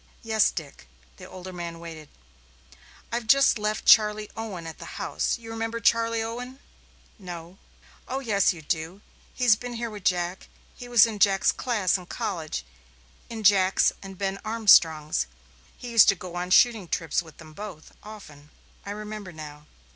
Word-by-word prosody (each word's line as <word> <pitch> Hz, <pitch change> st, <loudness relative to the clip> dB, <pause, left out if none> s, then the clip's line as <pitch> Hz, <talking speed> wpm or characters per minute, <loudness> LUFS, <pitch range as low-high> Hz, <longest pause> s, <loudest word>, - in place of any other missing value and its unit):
"Yes, 220 Hz, -2 st, +3 dB
Dick." 150 Hz, -, -8 dB, 0.3 s
The -, -, -12 dB
older 185 Hz, 0 st, -9 dB
man 170 Hz, -1 st, -6 dB
waited. 160 Hz, -3 st, -10 dB, 1.0 s
"I've 235 Hz, -1 st, -3 dB
just 275 Hz, -2 st, +5 dB
left 210 Hz, 0 st, -2 dB
Charley 210 Hz, -1 st, +5 dB
Owen 205 Hz, -7 st, -6 dB
at 160 Hz, -, -9 dB
the -, -, -9 dB
house -, -, -1 dB
you 225 Hz, -1 st, -10 dB
remember 225 Hz, +1 st, -3 dB
Charley 230 Hz, 0 st, +2 dB
Owen?" 245 Hz, +3 st, -6 dB, 0.6 s
"No." 175 Hz, -1 st, -9 dB, 0.5 s
"Oh, 265 Hz, -, -3 dB
yes, 210 Hz, -7 st, +2 dB
you 165 Hz, -4 st, -9 dB
do 160 Hz, +6 st, -3 dB, 0.3 s
he's 245 Hz, -4 st, +4 dB
been 245 Hz, +2 st, -7 dB
here 235 Hz, -1 st, -4 dB
with 205 Hz, -3 st, -9 dB
Jack. 180 Hz, 0 st, -1 dB, 0.3 s
He 245 Hz, -, -10 dB
was 240 Hz, -3 st, +7 dB
in 220 Hz, -3 st, -5 dB
Jack's 195 Hz, -1 st, +4 dB
class 210 Hz, -7 st, 0 dB
in 180 Hz, -, -13 dB
college 160 Hz, -, -4 dB, 0.6 s
in 225 Hz, -2 st, -6 dB
Jack's 195 Hz, -1 st, +4 dB
and 195 Hz, -1 st, -10 dB
Ben 195 Hz, 0 st, -2 dB
Armstrong's. 175 Hz, -9 st, +4 dB, 0.5 s
He 245 Hz, -2 st, -8 dB
used 230 Hz, -2 st, +7 dB
to 195 Hz, -, +4 dB
go 180 Hz, -1 st, -9 dB
on 175 Hz, +1 st, -4 dB
shooting 220 Hz, -1 st, +4 dB
trips 165 Hz, -1 st, -1 dB
with 160 Hz, -3 st, -15 dB
them 155 Hz, -2 st, -13 dB
both 200 Hz, -4 st, -9 dB
often." 155 Hz, -9 st, -12 dB, 0.3 s
"I -, -, -9 dB
remember 210 Hz, -2 st, -7 dB
now." 150 Hz, -2 st, -11 dB
200 Hz, 160 wpm, -26 LUFS, 170-225 Hz, 1.0 s, was